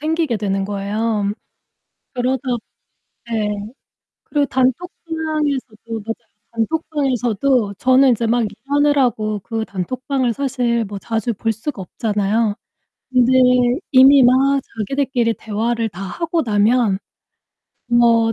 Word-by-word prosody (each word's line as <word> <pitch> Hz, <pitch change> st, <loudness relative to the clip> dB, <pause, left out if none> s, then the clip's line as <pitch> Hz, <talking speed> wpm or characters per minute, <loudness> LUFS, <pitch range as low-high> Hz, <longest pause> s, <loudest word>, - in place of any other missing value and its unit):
생기게 315 Hz, -4 st, 0 dB
되는 195 Hz, -2 st, -1 dB
거예요. 205 Hz, +1 st, -1 dB, 0.8 s
그러다 255 Hz, 0 st, -1 dB, 0.9 s
예. 215 Hz, -2 st, 0 dB, 0.8 s
그리고 290 Hz, -2 st, 0 dB
단톡방에서도 275 Hz, -4 st, -2 dB
맞아요. 225 Hz, +2 st, -3 dB, 0.4 s
단톡방에서도 250 Hz, -4 st, 0 dB
저는 260 Hz, +1 st, +5 dB
인제 230 Hz, -1 st, +1 dB
막 235 Hz, +1 st, +2 dB
일하느라고 270 Hz, -7 st, +1 dB
그 225 Hz, +3 st, -4 dB
단톡방을 255 Hz, +6 st, -2 dB
사실 245 Hz, -4 st, 0 dB
뭐 200 Hz, 0 st, -6 dB
자주 225 Hz, +2 st, -2 dB
볼 225 Hz, +3 st, -1 dB
수가 225 Hz, +2 st, -6 dB
없잖아요. 210 Hz, +2 st, 0 dB, 0.6 s
근데 255 Hz, 0 st, +3 dB, 0.6 s
이미 265 Hz, 0 st, +7 dB
막 270 Hz, +3 st, +4 dB, 0.2 s
자기들끼리 240 Hz, 0 st, 0 dB
대화를 225 Hz, +1 st, -2 dB
다 190 Hz, -1 st, -10 dB
하고 335 Hz, -, -2 dB
나면 215 Hz, -1 st, +2 dB, 0.9 s
뭐 235 Hz, -1 st, +4 dB
235 Hz, 250 characters per minute, -19 LUFS, 215-270 Hz, 0.9 s, 이미